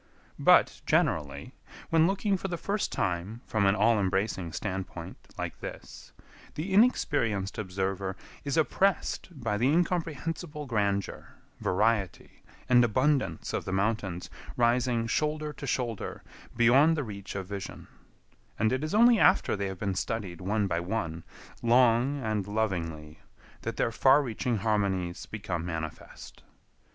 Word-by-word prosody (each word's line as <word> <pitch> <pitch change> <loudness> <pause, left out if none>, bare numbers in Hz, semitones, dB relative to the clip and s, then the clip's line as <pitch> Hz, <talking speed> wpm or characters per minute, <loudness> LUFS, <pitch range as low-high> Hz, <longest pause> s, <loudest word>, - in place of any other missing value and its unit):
But, - - +5
generally, 70 -2 0 0.4
when 165 0 +5
looking 200 +1 +1
for 195 - -3
the 175 -2 -3
first 200 +4 -2
time 95 +5 -2
from 105 -3 +1
an 100 - +4
all 110 +2 +3
embracing 95 -2 -1
standpoint 90 -3 -5 0.2
like - - -5
this, - - -9 0.4
the 180 +6 -3
inexperienced 120 - +2
observer 95 -1 -2 0.3
is 140 +2 -2
oppressed 190 +6 +1
by 115 -10 -2
the 125 - +3
incomprehensible 165 -1 -1
grandeur, 100 -5 -2 0.2
variety, 100 -2 0 0.3
and 125 -1 +6
abundance 130 - +1
of - - -1
the - - -4
mountains 95 -2 -1 0.3
rising 120 0 +2
shoulder 150 +4 -1
to 140 - -8
shoulder 120 -4 -3 0.3
beyond 135 +7 +5
the 145 - -1
reach 100 -4 -7
of 95 -1 -3
vision; 100 0 -7 0.7
and 110 +3 +2
it 130 +3 -1
is 155 +5 -2
only 235 0 +6
after 185 - +4
they 100 -1 -2
have 95 -1 -6
been 100 0 -2
studied 95 -3 -3
one 105 +3 0
by 85 -3 0
one, 85 -3 -3 0.4
long 120 +3 +4
and 105 -3 -1
lovingly, 85 -8 -3 0.4
that - - -4
their - - +1
far 135 +5 +5
reaching 120 -1 -2
harmonies 95 -4 -1
become 95 -6 -4
manifest. 80 -2 -7
110 Hz, 135 wpm, -29 LUFS, 95-140 Hz, 0.7 s, and